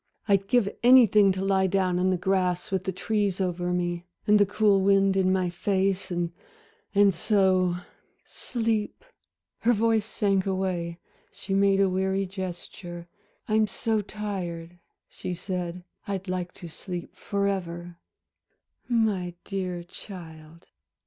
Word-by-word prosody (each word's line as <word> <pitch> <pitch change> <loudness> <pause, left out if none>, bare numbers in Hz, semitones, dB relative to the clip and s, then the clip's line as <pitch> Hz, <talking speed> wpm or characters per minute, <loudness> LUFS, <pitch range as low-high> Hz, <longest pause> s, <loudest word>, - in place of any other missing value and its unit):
"I'd 195 -1 +3
give 240 -3 +3
anything 230 -5 +7
to 190 +1 -3
lie 190 -1 +3
down 185 -1 +1
in 185 +1 +2
the 185 - +2
grass 180 -1 0
with 190 -1 -1
the 190 - 0
trees 200 0 -1
over 180 -1 -1
me, 175 0 -2 0.2
and 210 0 +5
the 205 - +4
cool 205 -1 +3
wind 195 0 +4
in 190 -1 +3
my 185 -2 +1
face, 195 +1 0
and 175 -1 -1 0.8
so 185 -1 +2 0.5
sleep" 225 - -2 0.5
Her 240 +1 +3
voice 225 0 +2
sank 200 -3 +1
away, 185 -3 -2 0.3
she 195 - -6
made 195 0 +4
a 195 - +5
weary 190 +1 0
gesture. 175 -2 -7 0.4
"I'm 215 0 +3
so 220 0 -1
tired," 175 -5 -5 0.3
she 180 - -5
said, 180 -1 -4 0.2
"I'd 195 -1 -3
like 180 -1 -3
to 175 - -9
sleep 175 +1 -7
forever." 175 -4 -3 0.9
"My 205 -7 +1
dear 185 -3 -3
child." 165 -3 -11
190 Hz, 130 wpm, -26 LUFS, 180-200 Hz, 0.9 s, anything